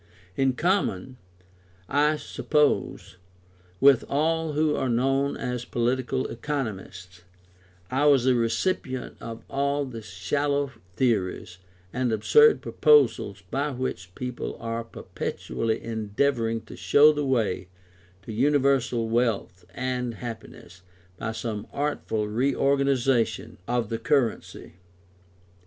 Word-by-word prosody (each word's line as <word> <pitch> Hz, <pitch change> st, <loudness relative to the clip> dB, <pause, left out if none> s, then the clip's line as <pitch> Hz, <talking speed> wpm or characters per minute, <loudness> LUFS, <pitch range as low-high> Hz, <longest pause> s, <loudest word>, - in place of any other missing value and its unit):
In 135 Hz, -1 st, +2 dB
common, 130 Hz, -, 0 dB, 0.7 s
I 150 Hz, +2 st, +2 dB
suppose, 150 Hz, -1 st, 0 dB, 0.6 s
with 135 Hz, -2 st, +6 dB
all 160 Hz, +2 st, 0 dB
who 150 Hz, 0 st, +2 dB
are 130 Hz, -, -1 dB
known 135 Hz, +4 st, +1 dB
as 125 Hz, -1 st, -3 dB
political 130 Hz, +2 st, -1 dB
economists, 95 Hz, -9 st, -5 dB, 0.7 s
I 135 Hz, +3 st, +1 dB
was 140 Hz, -4 st, +5 dB
a 130 Hz, -, +5 dB
recipient 125 Hz, +3 st, -1 dB
of 115 Hz, 0 st, -7 dB
all 140 Hz, +1 st, 0 dB
the 115 Hz, -4 st, -7 dB
shallow 140 Hz, +8 st, -1 dB, 0.2 s
theories 95 Hz, -7 st, -1 dB, 0.3 s
and 125 Hz, -1 st, 0 dB
absurd 450 Hz, -, +5 dB
proposals 120 Hz, -, +3 dB
by 140 Hz, +2 st, 0 dB
which 125 Hz, -9 st, -5 dB
people 125 Hz, -1 st, -5 dB
are 115 Hz, 0 st, -3 dB
perpetually 115 Hz, 0 st, -4 dB
endeavouring 115 Hz, +1 st, -1 dB
to 110 Hz, -, -12 dB
show 150 Hz, +2 st, +5 dB
the 150 Hz, 0 st, -2 dB
way 115 Hz, -9 st, 0 dB, 0.6 s
to 110 Hz, -, -7 dB
universal 130 Hz, -2 st, +2 dB
wealth 110 Hz, -6 st, -1 dB
and 125 Hz, 0 st, -3 dB
happiness 110 Hz, -5 st, -9 dB, 0.4 s
by 115 Hz, -, -3 dB
some 110 Hz, -2 st, -5 dB
artful 140 Hz, -7 st, -2 dB
reorganization 130 Hz, -3 st, +1 dB
of 120 Hz, -3 st, 0 dB
the 115 Hz, -, -3 dB
currency. 130 Hz, -, -1 dB
125 Hz, 110 wpm, -26 LUFS, 115-140 Hz, 0.7 s, with